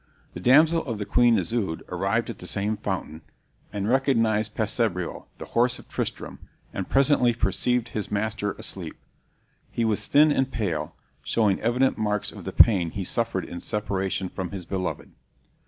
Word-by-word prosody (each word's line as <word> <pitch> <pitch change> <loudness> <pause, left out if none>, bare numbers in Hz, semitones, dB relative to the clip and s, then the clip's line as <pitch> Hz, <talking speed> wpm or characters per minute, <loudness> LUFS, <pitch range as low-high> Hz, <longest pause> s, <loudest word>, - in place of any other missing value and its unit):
The - - -7
damsel 155 - +5
of 105 -4 -4
Queen 120 -2 +4
Isoude 95 -2 -2
arrived - - -1
at - - -11
the - - -6
same 105 +2 -1
fountain, 95 -6 -4 0.5
and 100 0 -3
recognized 115 -5 +1
Passebreul, 105 -5 -1
the - - -8
horse 125 +1 +2
of - - -15
Tristram, - - -4 0.3
and 95 - -4
presently 135 -3 +3
perceived 115 +4 0
his 105 -3 -3
master 105 -1 -2
asleep. - - -6 0.7
He 115 - -1
was 110 -2 +1
thin 150 +2 +5
and 135 -2 0
pale, 85 -11 -3 0.3
showing 105 -4 +1
evident 125 +1 +1
marks 105 -1 -1
of - - -11
the - - -3
pain 95 -7 +5
he 95 +4 -4
suffered 115 -1 0
in 85 - -7
separation 95 -3 -2
from 90 -1 -5
his 95 -1 -6
beloved. 95 0 -4
110 Hz, 155 wpm, -25 LUFS, 95-120 Hz, 0.7 s, damsel